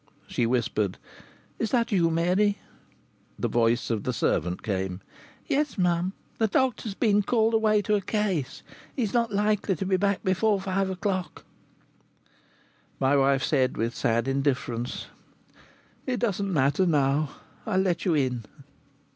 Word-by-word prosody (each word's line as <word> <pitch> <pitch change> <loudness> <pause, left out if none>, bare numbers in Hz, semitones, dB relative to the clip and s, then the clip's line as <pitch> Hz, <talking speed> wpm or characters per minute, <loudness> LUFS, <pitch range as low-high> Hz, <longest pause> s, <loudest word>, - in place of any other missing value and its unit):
She 115 - -1
whispered: 110 -5 0 0.6
"Is 225 - 0
that 235 -1 +1
you, 175 -5 +3
Mary?" 180 +5 +2 0.8
The - - -1
voice 120 +1 +1
of 110 -2 -1
the - - -1
servant 90 +3 -1
came: 95 -3 -2 0.5
"Yes, 290 -2 0
mum. 180 0 +1 0.3
The 220 - +3
doctor's 230 -3 0
been 210 -2 +3
called 225 +1 +2
away 215 -2 +3
to 210 - 0
a 205 - +2
case. 190 - -2 0.3
He's 225 -7 -1
not 235 -2 +1
likely 205 -1 +1
to 180 - -4
be 190 0 +2
back 200 0 0
before 195 +2 +2
five 190 0 -1
o'clock." 185 -1 -3 1.5
My 135 +1 +3
wife 135 -1 +3
said, 130 -4 +1
with 115 +1 -1
sad 115 +2 0
indifference: 135 -3 -1 1.0
"It 250 -2 -1
doesn't 200 -4 -1
matter 150 +3 +2
now. 145 -1 +1 0.3
I'll 205 -4 0
let 180 -3 0
you 175 -5 +2
in." 125 -5 0
185 Hz, 140 wpm, -26 LUFS, 135-210 Hz, 1.5 s, you